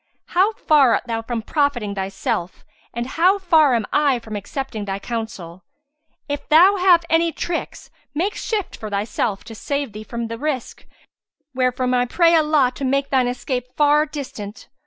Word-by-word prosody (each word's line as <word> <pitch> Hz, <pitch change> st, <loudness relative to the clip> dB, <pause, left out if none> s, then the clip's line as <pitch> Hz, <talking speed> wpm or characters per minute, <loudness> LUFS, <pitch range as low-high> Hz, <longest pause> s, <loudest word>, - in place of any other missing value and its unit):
How 385 Hz, +5 st, +3 dB
far 290 Hz, -, +4 dB
art -, -, -2 dB
thou 225 Hz, -1 st, -2 dB
from 230 Hz, 0 st, -4 dB
profiting 260 Hz, -8 st, 0 dB
thyself 190 Hz, -2 st, -3 dB, 0.3 s
and 235 Hz, 0 st, -4 dB
how 350 Hz, +9 st, +3 dB
far 320 Hz, -8 st, +4 dB
am 225 Hz, -3 st, 0 dB
I 285 Hz, -3 st, +3 dB
from 220 Hz, -2 st, -8 dB
accepting 215 Hz, +1 st, -5 dB
thy 195 Hz, -1 st, -3 dB
counsel! 200 Hz, -6 st, -6 dB, 0.6 s
If 290 Hz, -1 st, -5 dB
thou 360 Hz, +6 st, +6 dB
have 360 Hz, -2 st, +4 dB
any 330 Hz, 0 st, +2 dB
tricks, 340 Hz, +1 st, -5 dB, 0.2 s
make 375 Hz, +7 st, 0 dB
shift 425 Hz, -4 st, -3 dB
for 215 Hz, -, -7 dB
thyself 205 Hz, 0 st, -2 dB
to 225 Hz, -, -10 dB
save 280 Hz, +3 st, -3 dB
thee 215 Hz, +1 st, -7 dB
from 235 Hz, +1 st, -5 dB
the 230 Hz, 0 st, -6 dB
risk, 290 Hz, -3 st, -4 dB, 0.7 s
wherefrom 255 Hz, 0 st, 0 dB
I 245 Hz, 0 st, +2 dB
pray 335 Hz, +5 st, +3 dB
Allah 300 Hz, -5 st, +3 dB
to 275 Hz, -, -7 dB
make 275 Hz, +1 st, 0 dB
thine 260 Hz, -2 st, +3 dB
escape 250 Hz, 0 st, -3 dB
far 300 Hz, +1 st, +4 dB
distant! 250 Hz, -8 st, -8 dB
255 Hz, 165 wpm, -21 LUFS, 225-310 Hz, 0.7 s, thou